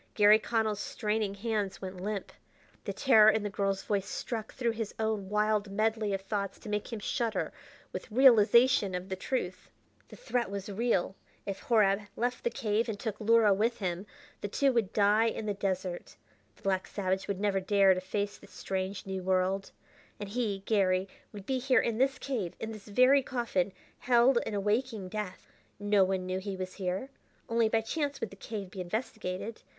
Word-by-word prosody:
Garry 210 0 +7
Connell's 220 -2 0
straining 210 -2 -2
hands 210 -2 -2
went 185 -1 -7
limp. 205 0 -3 0.5
The - - -2
terror 220 -6 +6
in 220 -1 +2
the 205 - -3
girl's 195 -1 -1
voice 200 -1 -1
struck 225 -3 -4
through 240 -2 -1
his 225 -2 -5
own 220 -3 -1
wild 210 0 +1
medley 215 +1 0
of 195 -1 -1
thoughts 200 0 -3
to 215 - -10
make 210 +3 -2
him 230 - -3
shudder 220 +2 -2 0.4
with - - -6
realization 235 -3 +5
of 180 +1 -5
the 190 - -2
truth. 185 -2 -3 0.4
The - - -12
threat 250 - -2
was 200 0 -5
real! 200 -3 0 0.3
If 195 -1 -4
Horab 210 -4 +3
left 245 +1 -2
the - - +2
cave 225 +1 -1
and 205 -2 -4
took 215 -2 -4
Luhra 220 -1 +5
with 230 +4 +1
him, 185 0 -3 0.3
the - - -2
two 270 +6 +2
would 225 -5 +1
die 210 +2 +4
in 225 - -3
the 205 - 0
desert. 185 -2 -3 0.4
The - - -24
black 190 -1 0
savage 190 -1 -2
would 200 -2 -2
never 200 -1 +1
dare 195 0 +4
to 185 - -3
face 205 +2 -3
the 200 - -15
strange, 190 0 -4
new 190 -1 -4
world. 190 +1 0 0.5
And 205 -1 -5
he, 205 -4 -2
Garry, 190 -3 +2 0.2
would 205 -3 -9
be 260 +2 0
here 255 0 +3
in 230 -1 -1
this 270 +1 +2
cave, 225 -11 -3
in 225 - -4
this 215 -2 -10
very 255 +6 +5
coffin, 235 -8 -1 0.3
held 245 0 +4
in 210 - -3
a - - 0
waking 210 -1 -1
death. 205 -3 -5 0.3
No 205 -1 +3
one 185 -1 -1
knew 185 0 -2
he 195 0 -5
was 185 0 -5
here; 190 +7 -3 0.4
only 230 -1 +2
by 225 0 +2
chance 285 +4 -2
would 225 - -4
the - - -10
cave 200 -2 -6
be 190 - -6
investigated. 215 +1 -4
210 Hz, 190 wpm, -30 LUFS, 195-225 Hz, 0.5 s, Garry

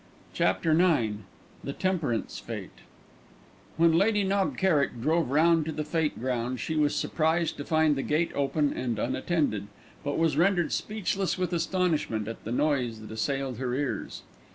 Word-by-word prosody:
CHAPTER 160 - +1
IX 155 - +3 0.5
THE 140 - -4
TEMPERANCE 165 -12 -1
FÊTE - - -5 1.1
When 165 0 +5
Lady 205 +3 +3
Knob 195 0 0
Kerrick 150 -10 +2
drove 160 +3 +1
round 165 +3 +4
to - - -1
the 155 - -3
Fête 155 0 -1
ground 125 0 -2
she 160 - -3
was 150 -1 +2
surprised 160 +1 0
to 145 - -4
find 155 -1 +2
the 135 - -1
gate 155 +5 0
open 145 +1 +1
and 120 -4 -2
unattended, 130 - -1 0.4
but 145 0 -2
was 160 -3 +2
rendered 175 -1 +3
speechless 200 -3 -1
with 180 -1 -1
astonishment 165 - 0
at 115 - -7
the 115 - -4
noise 125 -5 0
that 110 - -10
assailed 130 +2 -2
her 125 -1 -1
ears. 140 -1 -3
150 Hz, 155 wpm, -28 LUFS, 130-170 Hz, 1.1 s, When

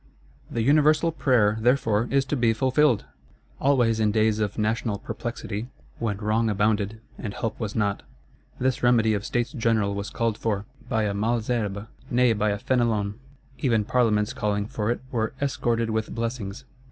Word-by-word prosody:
The 115 - -1
universal 155 +4 +4
prayer, 115 -8 +2
therefore, 115 -2 +2
is 135 -1 +2
to 140 - -1
be 120 -3 +3
fulfilled! 130 +1 +2 0.5
Always 120 -5 +3
in 110 -1 +3
days 110 0 +2
of 105 -2 -1
national 110 0 0
perplexity, 115 -1 -5 0.3
when 110 -4 -1
wrong 110 +2 +1
abounded 105 +1 0 0.2
and 105 -4 -5
help 115 - -3
was 110 -3 -4
not, 100 -2 0 0.6
this 130 +1 0
remedy 115 -3 +4
of 100 -1 -1
States 120 +1 -1
General 115 -6 +1
was 100 0 -4
called 115 -2 -1
for; 105 -2 -1 0.2
by 110 -1 +1
a 105 -1 0
Malesherbes, 110 -1 -1 0.2
nay 125 -1 +4
by 105 0 +1
a 100 - 0
Fénelon; 110 -4 0 0.5
even 115 -6 +2
Parlements 110 -3 +2
calling 105 -1 -1
for 105 0 -3
it 120 - -1
were 110 -3 -1
"escorted 120 -4 0
with 110 0 -2
blessings." 115 -1 -4
110 Hz, 160 wpm, -25 LUFS, 105-120 Hz, 0.6 s, universal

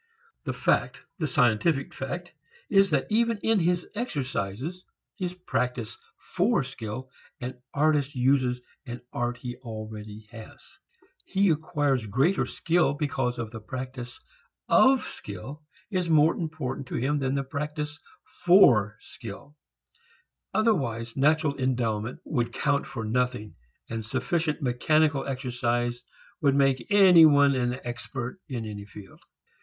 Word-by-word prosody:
The - - -2
fact, - - +1 0.2
the 155 - 0
scientific 135 +3 +2
fact, 175 +6 -5 0.4
is 195 -1 +5
that 140 -5 +1
even 230 +1 +2
in 225 -2 +3
his 175 0 +1
exercises, 145 - -3 0.3
his 180 -1 -4
practice 125 -10 -2 0.2
for 195 - +1
skill, 130 0 -7 0.3
an 125 0 -6
artist 145 -1 +1
uses 125 -1 +2 0.2
an 120 0 -6
art 120 0 -1
he 125 -1 -6
already 110 -3 -8
has. 115 -2 -13 0.4
He 195 -1 +2
acquires 145 -7 0
greater 135 - +2
skill 165 -4 +1
because 140 -5 -1 0.3
practice 130 -2 -6 0.5
of 265 -1 +5
skill 120 +10 -8 0.3
is 180 -3 0
more 155 0 +5
important 150 -5 -4
to - - -5
him 145 +4 0
than 135 0 0
practice 150 +1 -4 0.4
for 120 - +6
skill. 120 +7 -10 1.0
Otherwise 125 - 0
natural 145 +1 +2
endowment 120 -3 -1
would 120 -5 -1
count 140 +1 0
for 115 -3 -5
nothing, 125 -1 -1 0.3
and 115 -1 -4
sufficient 160 - -1
mechanical 145 +4 +2
exercise 120 -2 -1 0.4
would 140 -3 +3
make 135 -2 +2
any 190 -5 +8
one 145 -1 +5
an 125 0 -1
expert 120 +5 -5
in 120 -4 -4
any 105 -1 -6
field. 100 -1 -13
135 Hz, 120 wpm, -27 LUFS, 120-155 Hz, 1.0 s, any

